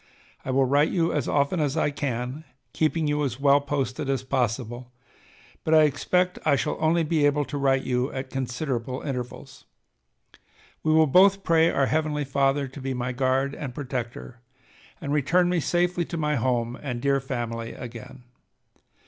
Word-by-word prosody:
I - - -7
will 135 +1 +3
write 145 +4 +3
you 170 -2 +1
as 145 -4 -1
often 145 +4 +1
as 145 0 0
I 150 - +1
can, 130 0 -3 0.3
keeping 160 0 +1
you 150 0 0
as 130 -2 -3
well 140 0 +4
posted 140 0 -2
as 135 -2 0
possible, 125 -1 -2 0.7
but 160 - +3
I 155 - +7
expect 180 +5 +1
I 150 -3 +3
shall 125 - -1
only 165 +1 +2
be 155 -1 +1
able 145 0 +1
to 145 - -5
write 135 -1 +2
you 125 +2 -1
at 130 -1 -6
considerable 130 -1 -3
intervals.... 125 - -6 1.2
We 155 - +1
will 160 0 +5
both 195 +6 +5
pray 165 0 +4
our 135 -4 +2
Heavenly 150 0 0
Father 135 +1 +1
to 135 +2 -10
be 130 0 -3
my 125 0 -2
guard 130 +2 0
and 135 -5 -6
protector, 125 -3 -5 0.6
and 140 - -3
return 175 +5 +2
me 180 -1 +1
safely 175 +3 +1
to 170 - -5
my 150 -1 0
home 120 -1 -1
and 125 -4 -4
dear 140 +2 +2
family 115 -3 -4
again. 125 +2 -10
140 Hz, 170 wpm, -25 LUFS, 125-155 Hz, 1.2 s, I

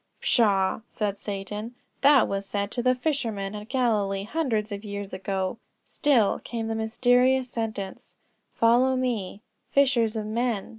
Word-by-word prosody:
"Pshaw," 200 -4 +2
said 205 -2 -3
Satan, 210 +3 -5 0.3
"that 280 -2 +6
was 195 0 -3
said 200 0 -2
to 245 - -1
the 255 +1 +3
fishermen 235 -8 -2
at 210 +1 -8
Galilee 210 -7 +1
hundreds 225 -4 -1
of 200 +1 -5
years 200 -1 -6
ago." 190 +2 -3 0.2
Still 255 -9 +2
came 230 -2 -4
the - - -1
mysterious 245 +3 +2
sentence: 215 -4 -5 0.4
"Follow 245 +3 +3
me;" 230 -6 -2 0.3
"fishers 250 -5 +3
of 215 -1 -2
men!" 225 -1 -1
220 Hz, 140 wpm, -26 LUFS, 200-250 Hz, 0.4 s, that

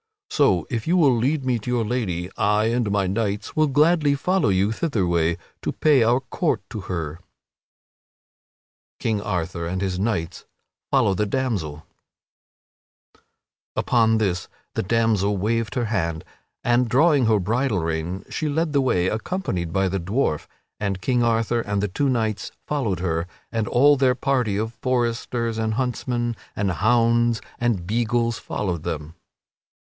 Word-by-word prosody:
So, 100 - +3
if 115 +1 -2
you 175 +2 +3
will 140 -7 +5
lead 135 +4 0
me 125 -2 +1
to 110 - -7
your 120 -2 +1
lady, 95 -7 -2
I 105 0 +2
and 120 -3 0
my 100 -1 +1
knights 100 +1 -2
will 155 0 +3
gladly 150 +1 +3
follow 180 - +1
you 95 +2 +2
thitherway 85 - 0 0.2
to - - -1
pay 150 -4 +3
our 120 +3 +3
court 150 +4 -1
unto 105 -6 -6
her." 80 -5 -2
[Sidenote: 85 +1 -28
King 110 -3 0
Arthur 85 -3 -3
and 90 +2 -2
his 95 -1 -2
knights 95 -5 -2 0.4
follow 95 - +3
the 105 +3 0
damsel] 100 - -2 1.9
Upon 115 -2 +3
this 95 -5 -1 0.3
the - - -1
damsel 105 -1 +1
waved 115 +4 -1
her 120 -2 0
hand, 85 -7 -1 0.4
and 120 0 +2
drawing 140 -1 +4
her 110 -1 +4
bridle 110 +1 0
rein 85 +3 -3
she 155 - -2
led 155 +1 0
the 140 - +3
way, 90 -9 +2
accompanied 110 - -2
by 95 +1 +1
the 95 +1 -1
dwarf, 95 - -1 0.3
and 100 -2 -2
King 125 +4 +1
Arthur 115 0 +1
and 100 -2 -2
the 105 - 0
two 140 +9 0
knights 110 -4 -1
followed 115 - -1
her, 85 -2 -1 0.2
and 115 -2 -1
all 145 +6 +5
their 130 -1 +3
party 125 -7 0
of 110 +2 -2
foresters 120 -2 -1
and 110 -1 0
huntsmen 120 -1 -1 0.2
and 100 -2 0
hounds 115 +3 +3 0.2
and 115 -7 0
beagles 115 +2 0
followed 90 -6 -3
them. 80 -2 -5
110 Hz, 155 wpm, -23 LUFS, 95-125 Hz, 1.9 s, will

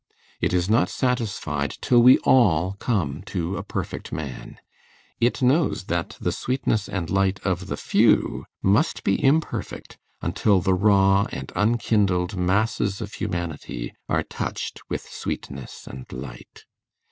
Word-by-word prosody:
_ - - -57 0.4
It - - +1
is 90 0 +1
not 110 +3 +3
satisfied 100 - -1
till 120 -1 +4
we 125 +2 +8
all 95 -8 +4
come 90 - -1
to 90 -1 -2
a - - -3
perfect - - -5
man; 75 -4 -6 0.6
it 120 +2 +1
knows 140 - +2
that 85 -1 -3
the - - -1
sweetness 125 -5 -1
and 90 -4 -3
light 95 0 +2
of 95 -1 -1
the - - -3
few - - +2 0.2
must 105 - +2
be 100 - +1
imperfect 150 +4 0 0.2
until 100 -3 +2
the 95 +2 +1
raw 95 0 +4
and 65 0 -6
unkindled 105 -4 +1
masses 100 +2 0
of 105 -2 -6
humanity 85 - -4 0.2
are - - +1
touched - - -5
with - - -2
sweetness 70 -2 -6
and 65 0 -10
light. 65 -1 -9
95 Hz, 140 wpm, -24 LUFS, 85-110 Hz, 0.6 s, we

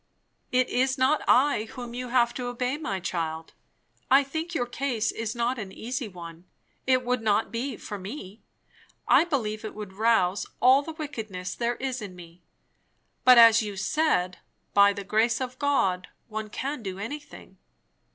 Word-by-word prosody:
"It 255 0 +3
is 260 +2 +1
not 265 +4 +3
I 255 -4 +4
whom 240 +1 -8
you 250 +1 -5
have 240 -1 +2
to 245 0 -4
obey, 250 +2 -2
my 220 -11 -3
child. 165 -3 -4 0.6
I 270 +2 +6
think 320 +5 -5
your 245 - +1
case 245 -2 -1
is 225 0 -4
not 240 +1 -1
an 195 -3 -6
easy 245 +5 -4
one; 170 -2 -10 0.4
it 255 -1 +3
would 250 -1 0
not 215 0 +1
be 245 +4 -3
for 205 -2 -7
me; 200 0 -8 0.7
I - - +6
believe 220 -10 -2
it 215 - -6
would 210 -3 -7
rouse 205 -3 +2
all 260 +3 +6
the 320 +3 -7
wickedness 220 - -6
there 240 0 -1
is 260 -1 -4
in 195 -3 -8
me; 170 0 -14 0.8
but, 255 -1 +8
as 230 -1 +8
you 205 -2 -5
said, 190 - 0 0.3
by 200 0 +6
the 200 0 -6
grace 225 +3 +1
of 255 -1 -5
God 195 -11 +1 0.2
one 215 -1 -5
can 275 +5 -4
do 190 -3 -5
anything. 285 +9 -8
235 Hz, 170 wpm, -26 LUFS, 200-260 Hz, 0.8 s, but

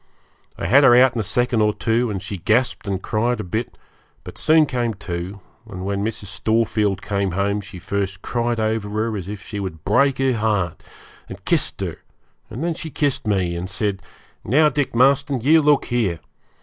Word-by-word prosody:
I - - -4
had 130 - +5
her 120 -3 +7
out 130 +1 +6
in 120 - -3
a - - 0
second 120 +2 0
or 105 0 +2
two, 115 +3 0
and 100 -3 -4
she 95 0 -5
gasped 115 +4 0
and 95 -1 -2
cried 120 +3 0
a - - -3
bit, 110 +6 -4 0.5
but - - -10
soon 155 0 +4
came 120 -5 -2
to, 95 +1 -6 0.3
and 95 -2 -6
when 100 0 -1
Mrs. 110 -1 -4
Storefield 105 -1 0
came 100 -3 -1
home 100 +2 0
she 95 -1 -11
first 95 +1 -3
cried 120 -1 -1
over 110 -1 -1
her 110 +1 -1
as 95 -3 -5
if 100 -1 -7
she 105 - -6
would 80 -5 -6
break 130 +7 +3
her 135 -1 +2
heart, 105 -7 -1 0.5
and - - -10
kissed - - 0
her, - - -3 0.5
and 130 - -5
then 170 0 0
she 160 0 -6
kissed 145 -6 -1
me, 95 -4 0
and 90 +2 -4
said, 100 0 -2 0.4
'Now, 150 +8 +4
Dick 145 -5 -2
Marston, 135 +2 +3
you 155 +6 +5
look 150 -1 +3
here. 110 -9 0
110 Hz, 195 wpm, -21 LUFS, 100-125 Hz, 0.5 s, her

